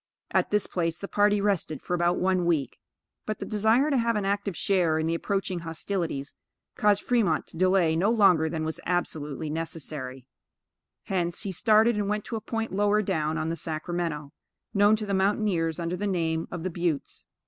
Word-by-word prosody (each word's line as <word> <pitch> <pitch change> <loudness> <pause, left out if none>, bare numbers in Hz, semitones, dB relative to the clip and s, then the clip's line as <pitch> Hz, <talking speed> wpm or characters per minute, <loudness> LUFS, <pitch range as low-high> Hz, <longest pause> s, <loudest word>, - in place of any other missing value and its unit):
At - - +2
this 210 -1 +2
place 165 -2 -2
the 200 - -6
party 205 0 +3
rested 195 -7 0
for - - -3
about 175 0 +2
one 185 -1 +1
week; 155 -7 0 0.5
but 215 - -2
the - - -5
desire 220 +7 +2
to 275 - +3
have 230 0 +1
an 205 -2 -1
active 200 -3 -1
share 175 -5 +2
in 160 - 0
the 165 - 0
approaching 190 +1 -1
hostilities, 165 -3 -3 0.4
caused 205 -1 +2
Fremont 215 -11 +1
to - - -12
delay 185 -3 +3
no 185 +6 +2
longer 190 -8 +4
than 160 -1 -3
was 160 - -3
absolutely 155 -4 -2
necessary; 150 -5 -5 0.8
hence, 175 -1 -1
he 200 - -2
started 220 +4 +4
and 205 -1 -1
went 210 0 -1
to 230 - -4
a 220 - -3
point 225 +1 -3
lower 205 +2 +2
down 155 -3 -1
on 155 +1 -1
the 165 - -1
Sacramento, 160 -2 -3 0.4
known 205 +1 +5
to 215 0 -4
the 200 - -2
mountaineers 190 -4 +1
under 170 +1 -2
the 205 +3 -2
name 165 -3 -1
of 175 -2 -6
the 185 - -2
Buttes. 170 -4 -3
180 Hz, 190 wpm, -27 LUFS, 160-205 Hz, 0.8 s, known